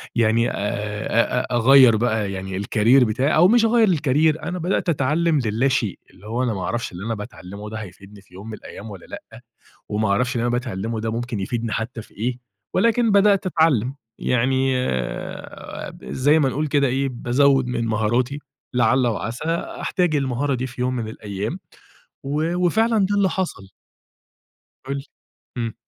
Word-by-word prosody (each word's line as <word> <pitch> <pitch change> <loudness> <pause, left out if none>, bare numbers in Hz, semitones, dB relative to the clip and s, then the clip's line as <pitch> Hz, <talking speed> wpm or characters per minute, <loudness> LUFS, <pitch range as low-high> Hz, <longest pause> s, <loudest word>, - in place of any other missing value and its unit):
يعني 115 0 +3
آآ - - -5
أ 105 +4 -1
أ - - +1
أ 125 - -3
أغَيَّر 125 -1 +7
بقى 110 -3 0
يعني 95 0 -5
الكاريير 110 +6 +4
بتاعي 130 +7 +1
أو 175 +3 +6
مش 230 +2 +4
أغَيَّر 225 -1 +4
الكاريير 155 -1 +2
أنا 180 0 -3
بَدأت 175 +1 0
أتعلم 155 +2 +2
للاشيء، 115 -1 0
اللي 100 +3 -15
هو 120 +3 -1
أنا 120 -3 0
ما 95 - -4
اعرفش 120 -3 -2
اللي 90 +4 -7
أنا 115 -1 -1
باتعلمه 105 0 -8
ده 110 - -6
هيفيدني 100 0 -11
في 95 - -26
يوم 95 +4 -10
من - - -6
الأيام 110 - -10
والّا 95 - -10
لأ، - - -11 0.5
وما 105 0 0
اعرفش 125 +5 +1
اللي 115 - 0
أنا 120 - 0
باتعلمه 115 -2 -2
ده 110 0 -2
ممكن 120 -1 -3
يفيدني 115 +3 -3
حتى 115 +2 -3
في - - -17
إيه 120 +3 -2 0.4
ولكن 230 0 +3
بَدأت 200 -1 +4
أتعلم 145 - +2 0.2
يعني 130 +2 +1
آآ، 65 - -5
زي 135 - +2
ما 135 -3 +3
بنقول 150 +4 -1
كده 140 -1 +2
إيه 135 +2 0
بازَوَّد 135 +2 +2
من 120 -2 -1
مهاراتي 120 +6 0 0.4
لَعَلّ 125 +1 +3
وعَسى 115 +3 -3 0.4
أحتاج 180 -5 +1
المهارة 135 0 0
دي 130 +1 -3
في 125 0 -8
يوم 125 0 0
من 115 -3 -3
الأيام، 105 - -5 0.7
و 155 +5 -1
وفعلًا 220 +6 +2
ده 200 +1 +2
اللي 195 -2 +3
حصل. 165 - -4 1.2
قُل 140 +1 -2
لي، 135 - -6 0.5
امم. 115 -2 -3
125 Hz, 175 wpm, -22 LUFS, 110-145 Hz, 1.2 s, أغَيَّر